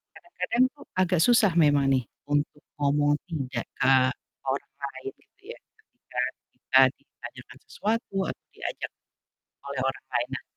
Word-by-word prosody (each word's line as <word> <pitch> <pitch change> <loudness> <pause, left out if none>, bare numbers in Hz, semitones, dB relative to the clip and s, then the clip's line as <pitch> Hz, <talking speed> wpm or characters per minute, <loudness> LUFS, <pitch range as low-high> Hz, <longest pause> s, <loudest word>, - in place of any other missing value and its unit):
kadang-kadang 255 -8 0
tuh 290 -1 -15 0.2
agak 180 -1 +2
susah 230 -6 +5
memang 145 -2 +4
nih 130 -1 +2 0.3
untuk 145 0 0 0.2
ngomong 145 +1 +3 0.2
tidak 135 -7 -3
ke 135 +1 +5 0.5
orang 135 +1 -2
lain, 140 - -5
gitu - - -33
ya, - - -16 0.2
ketika 435 - -9 0.3
kita - - +2 0.2
ditanyakan - - -12
sesuatu 220 -1 -2
atau - - -7
diajak - - -4 0.8
oleh 140 -2 -2
orang 135 - -5
lain. 120 - -2
Nah 135 - -5
145 Hz, 135 wpm, -27 LUFS, 135-210 Hz, 0.8 s, susah